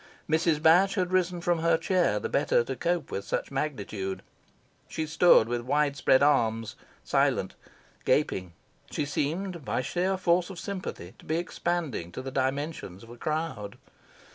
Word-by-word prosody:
Mrs. 160 -1 +2
Batch 175 +6 +5
had 185 -3 0
risen 180 -1 +1
from 175 -1 +1
her 165 0 +3
chair, 175 +1 +1
the - - -3
better 485 -1 +2
to - - -4
cope 170 -3 -1
with 100 - -3
such - - -3
magnitude. 105 -9 -3 0.6
She 160 - -3
stood 160 -6 +5
with 120 0 -1
wide 140 +3 +1
spread 135 -1 +4
arms, 115 -6 +2 0.3
silent, - - +1 0.5
gaping. 90 -2 +1 0.4
She 145 - -2
seemed, 165 +5 -2
by 130 - -1
sheer 185 +7 0
force 175 0 +2
of 190 - -8
sympathy, 180 - -6
to - - -16
be 155 - -1
expanding 170 - -2
to 130 - -6
the 135 - -5
dimensions 135 - -3
of 115 - -13
a 120 - -11
crowd. 155 -10 -3
155 Hz, 160 wpm, -28 LUFS, 125-175 Hz, 0.6 s, Batch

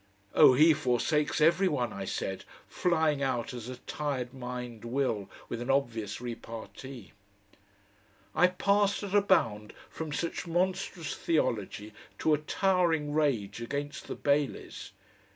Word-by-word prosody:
"Oh, 130 - +8
HE 155 +4 +7
forsakes 150 +4 +1
every 170 +5 +5
one," 125 - -1
I 100 0 -5
said, 95 0 -3 0.2
flying 160 -5 +1
out 130 -3 -1
as 120 -1 -6
a 130 - -5
tired 130 -3 -3
mind 125 -3 -6
will, 120 -5 -1 0.2
with 115 - -4
an 120 - -5
obvious 115 -7 0
repartee.... 115 -1 -8 1.2
I 180 - +5
passed 200 +2 +2
at 200 -1 -5
a 205 - +6
bound 105 - +1 0.2
from 160 -2 -5
such 170 +3 -3
monstrous 180 -1 -1
theology 110 - -1 0.2
to 155 - +2
a 150 - +2
towering 165 -3 +1
rage 120 -9 0
against 145 +4 -4
the - - -4
Baileys. 145 -1 -1
140 Hz, 135 wpm, -30 LUFS, 120-165 Hz, 1.2 s, Oh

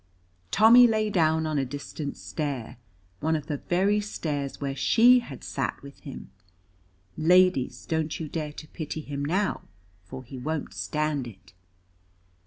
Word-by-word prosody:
Tommy 235 +3 +7
lay 215 -2 0
down 160 -3 +2
on 155 -2 0
a - - +1
distant 140 +2 -6
stair, 140 -9 -4 0.4
one 160 +1 +1
of 150 - -3
the 150 - -3
very 195 +7 +1
stairs 145 -9 -4
where 140 -1 -3
she 240 - +5
had 140 - -9
sat 135 -4 -3
with 140 0 -12
him. - - -10 0.9
Ladies, 180 -3 +3
don't 160 0 -2
you 160 - -4
dare 150 -1 -4
to 155 - -10
pity 155 -1 -5
him 140 -1 -5
now, 190 +8 0 0.4
for 115 +8 -9
he 130 +1 -9
won't 150 -5 -3
stand 140 - -2
it. 95 -4 -14
155 Hz, 150 wpm, -27 LUFS, 140-180 Hz, 0.9 s, Tommy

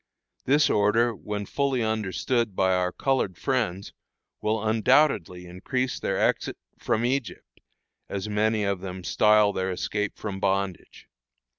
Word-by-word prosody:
This 145 +3 +4
order, 115 +3 +2
when 105 0 -5
fully 135 -2 0
understood 110 +1 -1
by 95 0 +2
our 90 0 +1
colored 130 -5 -1
friends, 110 -8 -2 0.5
will 110 0 0
undoubtedly 110 - +2
increase 125 +9 -3
their - - -1
exit - - 0 0.2
"from 115 +2 0
Egypt," 130 0 -3 0.5
as 100 +1 -4
many 105 +1 +1
of 100 -2 -1
them 95 -1 -7
style 105 +1 +4
their 95 0 -2
escape 105 +3 -3
from 100 -3 -5
bondage. 95 -2 -2
105 Hz, 130 wpm, -26 LUFS, 95-120 Hz, 0.5 s, This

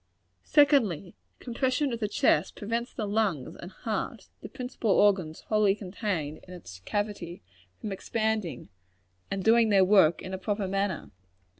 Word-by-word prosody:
Secondly 235 - +3 0.2
compression 260 +2 -1
of 230 - -3
the 210 - -1
chest 270 +6 +2
prevents 230 +4 -3
the 215 - -4
lungs 200 -10 -1
and 175 - -9
heart 215 +1 -4
the - - -8
principal 250 -3 -4
organs 190 -6 +3
wholly 210 -2 +2
contained 185 -7 -4
in 180 - -9
its 95 - -11
cavity 205 -5 -3 0.4
from 210 - -5
expanding, 215 -1 -2 0.6
and 195 -1 -3
doing 225 +1 +5
their 195 -2 +5
work 185 -5 +5
in 185 - -6
a 190 - -3
proper 200 0 -2
manner. 195 -2 -2
205 Hz, 145 wpm, -28 LUFS, 185-225 Hz, 0.6 s, doing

